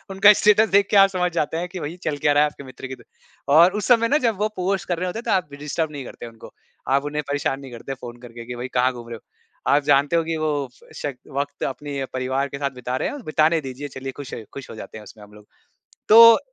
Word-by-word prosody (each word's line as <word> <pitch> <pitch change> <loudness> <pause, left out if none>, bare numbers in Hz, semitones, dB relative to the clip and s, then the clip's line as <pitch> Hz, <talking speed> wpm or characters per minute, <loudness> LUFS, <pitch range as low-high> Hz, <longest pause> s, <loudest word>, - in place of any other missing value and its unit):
उनका 205 +2 +8
स्टेटस 210 +1 +5
देख 200 0 +3
के 205 - +5
आप - - -2
समझ 180 0 +1
जाते 155 +2 -1
हैं 180 - -4
कि 180 - -3
भाई 165 +4 -6
चल 150 -2 -2
क्या 145 - +5
रहा 145 +1 +5
है 150 - +2
आपके 140 - -13
मित्र 130 0 -9
की 130 - -7
दु - - -19 0.5
और 175 +3 +7
उस - - -3
समय 230 -2 +5
ना 290 - +3
जब 220 -4 0
वो 210 - +2
पोस्ट 190 +1 -1
कर 175 -2 -1
रहे 180 +1 -2
होते 220 +5 -4
हैं - - -8
तो 230 - -2
आप 180 -6 +1
डिस्टर्ब 150 +1 -2
नहीं 140 -3 -7
करते 120 - -9
उनको 115 -1 -13 0.4
आप 140 - -3
उन्हें 150 0 -3
परेशान 140 -1 -1
नहीं 135 -2 -11
करते 120 +3 -7
फ़ोन 120 -1 -8
करके 115 0 -10
कि 125 0 -6
भाई 125 +1 -5
कहाँ 125 +1 +3
घूम 120 -1 -10
रहे 115 - -5
हो। - - -21 0.5
आप 145 0 +4
जानते 145 +2 +3
हो 165 - +3
कि 165 0 -3
वो 155 0 -1 0.5
श 145 - -3 0.2
वक़्त 145 0 -3
अपने 140 0 -4
परिवार 130 +2 -1
के 140 - -7
साथ 140 -1 0
बिता 125 0 -5
रहे - - 0
हैं 285 - -7
बिताने 155 +1 +2
दीजिए 135 +2 -6
चलिए 135 0 -7
खुश 140 -3 -8 0.2
खुश 140 - -9
हो - - -9
जाते 110 - -9
हैं 105 - -10
उसमें 105 +1 -14
हम 105 0 -16
लोग। 105 0 -16 0.6
तो 230 +1 +9
145 Hz, 270 wpm, -22 LUFS, 130-180 Hz, 0.6 s, तो